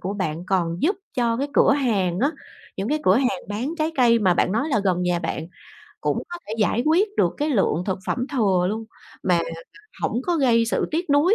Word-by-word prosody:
của 195 +3 -3
bạn 175 -4 -3
còn 175 -3 0
giúp 375 +7 +2 0.2
cho 235 -2 +1
cái 280 +3 -2
cửa 280 - +5
hàng 200 -10 0
á, 280 +4 +3 0.5
những 195 +3 -3
cái 305 +3 +1
cửa 185 +4 +5
hàng 265 0 +1
bán 230 +8 -3
trái 315 +1 0
cây 235 -2 +5
mà 185 -4 +3
bạn 185 - +1
nói 235 +9 0
là 220 -8 +1
gần 180 -2 +1
nhà 175 -1 +1
bạn 165 -1 -4 0.5
cũng - - -1
có 350 - -6
thể 215 - -4
giải 220 +2 +2
quyết 360 +7 +4
được 175 - +2
cái 295 +1 -1
lượng 190 - +1
thực 190 -1 -1
phẩm 250 0 -1
thừa 190 -8 +2
luôn 220 +2 -3 0.4
mà, 180 - +2
à, 170 - -3 0.5
hổng 240 - 0
có 350 -2 0
gây 235 -5 +3
sự 225 - 0
tiếc 325 0 -2
nuối 305 +9 +4
230 Hz, 230 wpm, -23 LUFS, 185-280 Hz, 0.5 s, cửa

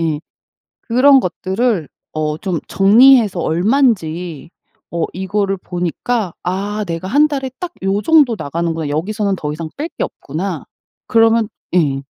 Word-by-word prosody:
예. 155 -2 -1 0.6
그런 265 +3 +5
것들을 190 - -1 0.2
어 155 0 -2
좀 180 -2 -2
정리해서 215 0 +5
얼만지 175 - 0 0.4
어 170 -1 -1
이거를 195 +1 -1
보니까 180 +3 -3
'아 200 +4 -2
내가 165 +2 -4
1 290 +8 +4
달에 270 -3 -3
딱 355 -1 -5
요 195 +2 +1
정도 295 -8 +4
나가는구나. 165 +1 -3
여기서는 200 +6 -1
더 150 -1 -4
이상 160 +1 -5
뺄 310 +3 -3
게 - - 0
없구나.' 165 +3 -5 0.4
그러면 225 -1 +3 0.2
예. 140 -6 +2
190 Hz, 255 characters per minute, -17 LUFS, 165-230 Hz, 0.6 s, 그런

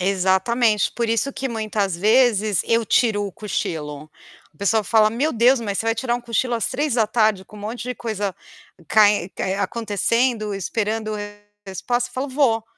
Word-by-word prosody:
Exatamente, 195 +4 +2
por 235 -1 -2
isso 230 +5 0
que 265 - -4
muitas 215 -5 -2
vezes 215 -4 +3
eu 230 0 +1
tiro 210 -3 +2
o 195 - -8
cochilo. 155 -7 -4 0.5
O - - -27
pessoal 210 +1 +1
fala: 215 0 +4
"Meu 275 +8 -1
Deus, 240 +2 +4
mas 200 -3 -3
você 225 - -2
vai 225 - +2
tirar 235 +1 -1
um 245 - -3
cochilo 240 +1 -1
às 230 - -1
15:00 225 -7 +1
com 210 - -15
um - - -10
monte 220 +4 -5
de 250 +1 -4
coisa 205 -5 -3 0.5
cae 205 -4 +4 0.3
acontecendo, 215 +2 0
esperando 215 +3 -2 0.5
resposta?" 240 +6 -2
Eu - - -21
falo: 265 +2 -3
"Vou!" 255 -5 +1
220 Hz, 165 wpm, -21 LUFS, 205-240 Hz, 0.5 s, fala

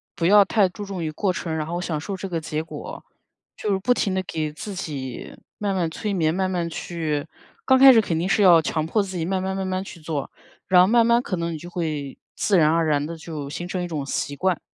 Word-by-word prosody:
不 165 - -1
要 205 +1 +7
太 200 -1 +3
注 205 +3 -8
重 195 -3 -5
于 155 - -2
过 185 +4 -1
程， 170 -2 -3
然 155 -1 -3
后 175 +2 -3
享 165 -4 -2
受 195 +6 -5
这 190 +1 -5
个 170 -2 -2
结 155 0 -3
果。 165 - -8 0.5
就 210 - -2
是 195 - +2
不 245 +6 +3
停 195 -5 -1
地 190 - 0
给 155 -4 -3
自 195 +7 -7
己 140 -9 -6 0.2
慢 200 -2 -1
慢 175 -3 0
催 210 +4 -3
眠， 160 -3 +1
慢 190 +1 0
慢 175 -2 -1
去 160 -3 -3 0.4
刚 260 - +5
开 265 0 +9
始 225 - +6
肯 170 -6 -2
定 170 +3 -1
是 195 - +2
要 175 -4 +8
强 155 0 -1
迫 210 +5 +1
自 190 -1 -7
己 165 - -1
慢 185 +1 -1
慢 190 0 -2
慢 190 -1 -2
慢 185 0 -2
去 190 - -11
做， 155 -3 -4 0.4
然 180 -1 +6
后 180 - +5
慢 230 +2 +4
慢 235 +1 +4
可 200 - -3
能 170 -1 -3
你 - - -4
就 175 +3 -9
会 155 -6 -4 0.2
自 200 - +2
然 155 -2 +5
而 165 0 +2
然 145 -1 +1
地 165 +2 -6
就 155 -3 -6
形 175 +4 -5
成 180 0 -3
一 - - -3
种 155 -4 -3
习 145 +1 -3
惯。 185 +2 0
175 Hz, 280 characters per minute, -23 LUFS, 160-195 Hz, 0.5 s, 开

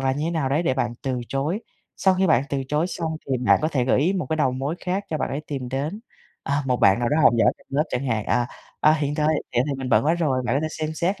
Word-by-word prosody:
là 135 0 +1
như 150 +4 -2
nào 155 -6 0
đấy 150 +5 +1
để 130 -6 +1
bạn 120 -3 -1
từ 130 -2 -2
chối. 150 +10 -1 0.4
Sau 190 -1 +3
khi 190 +1 +2
bạn 145 -6 +4
từ 135 -1 -1
chối 150 +4 +1
xong 165 -3 -3
thì 135 - 0
bạn 115 -5 +4
có 155 - +2
thể 135 -6 0
gợi 130 - +2
ý 175 +7 +2
một 180 -8 -2
cái 160 - 0
đầu 135 -5 +2
mối 135 +5 -2
khác 190 +2 -1
cho 155 - -1
bạn - - -1
ấy 140 - -3
tìm 135 -4 -4
đến. 145 - -3 0.4
À, 140 +1 -1
một 125 -1 +2
bạn 100 +1 +5
nào 120 -1 0
đó 150 - +1
học - - +7
giỏi - - +4
trong - - -24
lớp 140 +2 +1
chẳng 130 +2 -2
hạn, 110 -4 0
à, 120 - +1 0.3
"À, 155 - +6
hiện 145 -2 -1
tại 150 0 +1
vậy 155 -1 +1 0.2
thì 145 - -1
mình 130 -1 -4
bận - - +3
quá 160 +3 +3
rồi. 145 -7 0
Bạn 130 - +1
có - - +1
thể 155 - -1
xem 155 0 -4
xét 180 +5 -1
145 Hz, 300 wpm, -23 LUFS, 130-160 Hz, 0.4 s, học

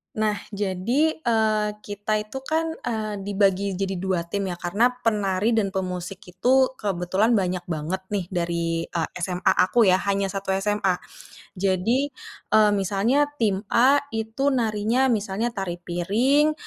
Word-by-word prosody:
Nah, 215 -1 0 0.2
jadi, 210 - +1
eee, 220 -4 +1
kita 205 +1 -3
itu 240 +5 -7
kan, 320 +4 -1 0.2
eee, 215 -3 -2
dibagi 195 -1 +1
jadi 195 -1 -2
2 185 -2 -1
tim 195 +3 -3
ya 180 - -3
karena 200 +8 +2 0.2
penari 205 -1 +1
dan 205 -4 0
pemusik 185 0 -4
itu 260 +8 +3
kebetulan 195 +4 +1
banyak 185 -2 0
banget 165 +3 -3
nih 200 -3 -2
dari, 170 -1 -1
eee, 165 -2 -2
SMA 180 +1 +1
aku 230 +6 +3
ya, 185 -1 +4
hanya 195 -1 0
1 195 -1 -2
SMA. 195 -1 +1 0.6
Jadi, 200 +9 +1 0.4
eee, 215 -1 +6
misalnya 205 +9 +2 0.2
tim 205 -2 +1
A 260 +4 +6 0.2
itu 225 +6 0
narinya 230 +2 +1
misalnya 215 0 0
tari 185 -5 -5
piring, 235 - +2
200 Hz, 140 wpm, -24 LUFS, 185-225 Hz, 0.6 s, eee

